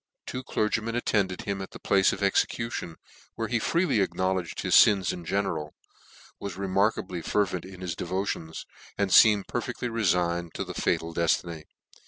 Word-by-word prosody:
Two 130 - -5
clergymen 115 0 -1
attended 100 -6 0
him 100 -1 -3
at 95 - -6
the - - -11
place 95 -1 +3
of 100 - -4
execution, 100 -2 0 0.4
where 115 - -2
he 120 - +1
freely 170 - +1
acknowledged 95 -2 -1
his - - +2
fins 100 -3 +1
in 90 - -7
general, 80 -6 -2 0.6
was 100 -3 -6
remarkable 95 -2 0
fervent 90 -2 -1
in 95 -1 -11
his 90 -2 -3
devo 95 +4 -2
tions, 80 -4 -5 0.3
and 100 -2 0
feemed 105 -3 +6
perfectly 125 0 -3
reftgned 85 -6 0
to - - -3
his - - -7
fatal 80 0 0
deftiny. 85 -1 0
95 Hz, 160 wpm, -27 LUFS, 85-105 Hz, 0.6 s, feemed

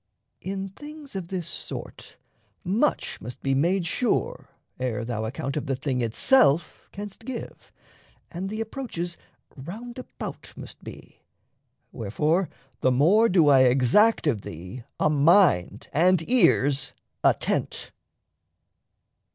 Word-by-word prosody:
In 195 +1 -4
things 295 +4 -11
of 185 -3 -4
this 180 -3 -4
sort, - - -8 0.5
much 215 +10 0
must 120 +2 -9
be 135 - +1
made 170 +6 +1
sure 230 +7 -1 0.3
Ere 125 -2 -2
thou 110 -2 -3
account 135 +4 -4
of 150 -1 -3
the 135 - 0
thing 130 -1 -2
itself 145 - +2
canst 205 +2 -8
give, 245 -1 -8 0.6
And 185 +2 -4
the 215 +2 -4
approaches 215 -8 -5 0.4
roundabout 230 - -8
must - - -11
be; - - -12 0.7
Wherefore 150 - 0 0.3
the 130 - +3
more 185 - +4
do 175 -5 +4
I 135 -2 +7
exact 135 - +4
of 125 -9 +1
thee 90 +9 -8 0.2
A - - +3
mind 150 - +3
and 175 +1 +3
ears 145 - +3 0.3
attent. - - 0
165 Hz, 120 wpm, -25 LUFS, 130-205 Hz, 0.7 s, I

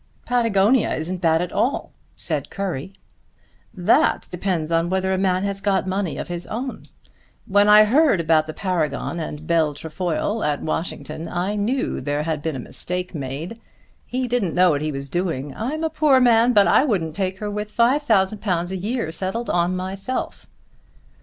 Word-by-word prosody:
"Patagonia 230 -1 +2
isn't 175 +3 -4
bad 165 0 +3
at 180 - -5
all," 265 - -1 0.2
said - - -2
Currie. 190 -4 -4 0.8
"That 180 -5 +2
depends 175 -3 -2
on 165 +1 +2
whether 190 0 0
a - - +1
man 185 -1 +1
has 200 0 -3
got 195 -2 +1
money 190 -2 -2
of - - -5
his 175 0 -5
own. 250 +4 -4 0.6
When 205 +1 +4
I 210 0 +9
heard 265 - +4
about 160 -1 +2
the 155 - -5
Paragon 170 -2 -2
and 155 -1 -6
Bell 160 -3 +1
Trefoil 175 +7 -2
at 150 -1 -1
Washington, 160 0 -4
I 180 +4 -2
knew 230 +6 -1
there 145 +1 -1
had 155 -2 -2
been 160 -1 -3
a - - -4
mistake 180 +8 -5
made. 150 - -5 0.5
He 255 0 -2
didn't 235 -8 0
know 180 -1 +5
what 145 -1 0
he 155 0 -1
was 140 -1 -5
doing. 150 -4 -2
I'm 290 +8 -3
a 320 - +1
poor 300 -4 +4
man, 240 -1 +5
but 205 -4 +5
I - - +5
wouldn't 175 - -1
take 190 0 -2
her 210 +1 -4
with 210 +1 -4
£5,000 210 - +1
a - - -2
year, 210 -2 -2
settled 195 +7 -3
on 175 +1 +1
myself." 195 +7 -4
185 Hz, 170 wpm, -22 LUFS, 165-215 Hz, 0.8 s, I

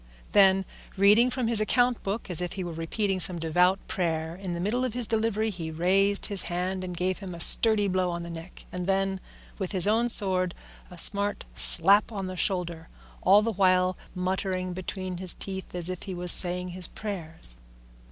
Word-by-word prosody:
Then, 195 -1 +4 0.3
reading 210 +5 +5
from 250 -1 -2
his 225 -2 +5
account 245 +2 +1
book 200 +4 -4
as 180 -3 -1
if 175 -1 -3
he 190 - -5
were 175 - -5
repeating 185 +4 -2
some 180 0 +4
devout 180 +3 +2
prayer, 165 -2 -2
in 185 -1 -6
the 170 - -4
middle 215 +8 -1
of 250 -3 -3
his 245 -1 0
delivery 220 0 -1
he 170 -4 -6
raised 195 +5 +1
his 200 -3 +2
hand 185 +2 -3
and 180 -1 -6
gave 185 +2 -2
him 190 -3 -7
a - - -10
sturdy 215 +3 +5
blow 185 -1 0
on 170 0 -4
the 170 - -8
neck, 165 +2 -10
and 180 0 -5
then, 195 0 0 0.4
with 190 0 -4
his 185 0 +4
own 230 +3 +2
sword, 185 -5 +3 0.3
a 180 - -13
smart 205 +3 0
slap 160 - +4
on 195 -3 -5
the 185 0 -6
shoulder, 175 -3 -3 0.3
all 200 +3 +5
the 230 0 -1
while 185 -1 +2 0.2
muttering 185 0 -2
between 185 0 -6
his 185 0 -2
teeth 190 -2 -6
as 175 -1 -3
if 185 -1 -5
he 190 -3 -6
was 175 0 +3
saying 180 0 +2
his 180 0 -5
prayers. 165 - -7
185 Hz, 195 wpm, -26 LUFS, 175-200 Hz, 0.4 s, reading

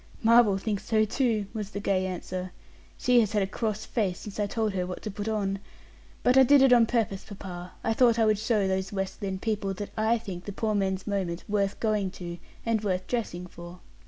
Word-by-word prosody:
"Marvel 225 -3 +6
thinks 200 0 -2
so, 215 -1 +2
too," 220 -2 0
was 210 -3 -4
the 205 - -5
gay 190 -2 +1
answer; 185 0 -5 0.5
"she 250 -1 +4
has 220 -3 +1
had 205 -2 +2
a - - +1
cross 215 +1 -3
face 195 -6 -1
since 210 0 -8
I 205 - +1
told 220 -1 -1
her 180 -1 -1
what 180 - -6
to 215 - -4
put 205 +2 -5
on. 200 -3 -1 0.6
But 250 +1 +4
I - - +9
did 270 +1 +6
it 265 -2 +6
on 235 -2 +6
purpose, 220 -5 0
papa; 180 -3 -8
I 225 - +1
thought 235 -1 +4
I 225 - +4
would 215 -1 +3
show 215 -3 +1
those 190 0 -1
West 195 +1 -4
Lynne 190 -2 -2
people 200 -2 -2
that 205 +2 -6
I 220 +2 +2
think 190 -6 -7
the 205 - -5
poor 215 +1 -1
man's 190 -2 0
moment 190 -4 -2
worth 200 -1 0
going 210 -3 +1
to, 175 -1 -6 0.3
and 225 -2 +1
worth 185 -2 -1
dressing 195 -7 -3
for." 175 0 -11
205 Hz, 220 wpm, -28 LUFS, 190-220 Hz, 0.6 s, I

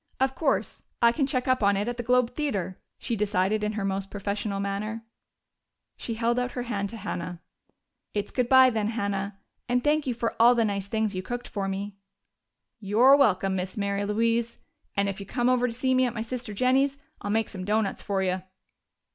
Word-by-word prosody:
"Of 265 0 +2
course, 275 +1 -1 0.2
I 235 0 +6
can 270 +2 0
check 255 -2 -1
up 255 -1 +2
on 200 -1 +3
it 205 +3 -1
at 240 0 -3
the - - -2
Globe 250 0 +2
Theater," 200 - -3 0.2
she 235 - -2
decided 205 0 +1
in 210 0 -1
her 205 -2 -2
most 195 0 -2
professional 200 0 -3
manner. 210 +3 -3 0.9
She 230 - -5
held 235 +2 +1
out 250 0 -2
her 245 - -3
hand 200 -5 -2
to 230 - -8
Hannah. 180 -4 -5 0.8
"It's 205 - -2
good 250 -2 0
bye, 260 -1 +7
then, 215 -2 0
Hannah 200 -3 -2 0.3
and 245 0 +2
thank 300 -1 +2
you 245 - 0
for 230 0 -2
all 240 +1 +7
the 230 -1 +3
nice 200 -2 -2
things 220 0 -1
you 185 - -3
cooked 245 +5 -5
for 200 -2 -3
me." 195 +1 -4 0.8
"You're 225 +7 +5
welcome, 195 -8 +3
Miss 185 +2 -4
Mary 200 0 -1
Louise. 230 +3 0 0.4
And 200 0 +2
if 195 0 -3
you 200 - -8
come 245 +3 +1
over 250 -1 +3
to - - -3
see 260 +3 0
me 255 0 +4
at 240 - -5
my 220 - -2
sister 240 -1 -5
Jennie's, 265 +5 +2 0.2
I'll 205 - -4
make 220 +1 +1
some 185 -2 -6
doughnuts 210 +1 0
for 195 -1 -1
you." 185 0 0
220 Hz, 205 wpm, -27 LUFS, 200-245 Hz, 0.9 s, bye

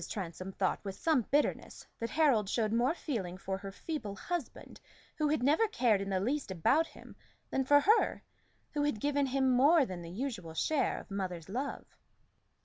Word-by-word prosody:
Transome 185 -1 -5
thought 190 0 -1
with 195 -2 -5
some 300 -5 +1
bitterness 290 +2 0
that 230 - -3
Harold 265 -11 +3
showed 220 -1 0
more 245 +7 +2
feeling 195 - -4
for 190 0 -4
her 195 0 -7
feeble 215 -3 -5
husband 345 - -5 0.4
who 305 - +2
had 295 -4 +1
never 310 - +4
cared 240 - +2
in 195 - -4
the 190 -1 +1
least 265 +7 -1
about 265 - +2
him, - - -14 0.4
than 270 - +1
for 290 +2 +6
her, 430 +9 +3 0.5
who 295 - -1
had 290 -7 0
given 285 +2 +1
him 265 0 +2
more 280 +4 +5
than 185 -4 -6
the 165 - -8
usual 190 -6 -5
share 285 - +1
of - - -10
mother's 185 -4 -4
love. 260 +7 -3
245 Hz, 180 wpm, -32 LUFS, 195-290 Hz, 0.5 s, for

